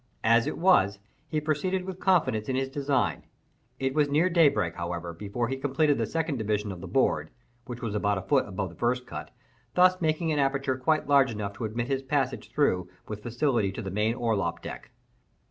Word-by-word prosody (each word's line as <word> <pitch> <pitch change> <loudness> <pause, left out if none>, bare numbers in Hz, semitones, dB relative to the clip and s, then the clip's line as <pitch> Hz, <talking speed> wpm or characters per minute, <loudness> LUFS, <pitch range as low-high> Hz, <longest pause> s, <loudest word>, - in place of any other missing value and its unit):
As 115 +1 +4
it - - -3
was, 160 - +4 0.3
he 155 0 -1
proceeded 180 +5 -1
with 185 -1 -6
confidence 155 - +2
in 130 - 0
his 135 0 -1
design. 140 0 0 0.5
It 135 0 -1
was 150 -1 +2
near 160 +6 +2
daybreak, 145 - +3
however, 85 0 -4
before 105 +7 -3
he 135 +2 -3
completed 145 +1 +1
the 115 - 0
second 160 +1 -1
division 105 -2 -1
of 90 -2 -8
the 95 - -7
board 130 +9 +1 0.4
(which 120 -1 -7
was 110 -3 -2
about 105 -1 +1
a 95 - -4
foot 140 -3 +2
above 95 -1 -3
the 85 - -14
first 125 +1 0
cut), - - -7 0.5
thus 185 0 +5
making 160 0 +1
an 150 - +1
aperture 135 -1 +1
quite 155 +5 +1
large 140 -2 +5
enough 105 -3 -4
to 115 - -3
admit 115 +2 -3
his 135 0 0
passage 135 -1 -1
through 90 -12 +1 0.2
with 105 -1 -6
facility 120 -3 0
to - - -6
the 95 - -5
main 105 +4 +1
orlop 110 -8 -1
deck. - - -8
130 Hz, 200 wpm, -27 LUFS, 105-150 Hz, 0.5 s, thus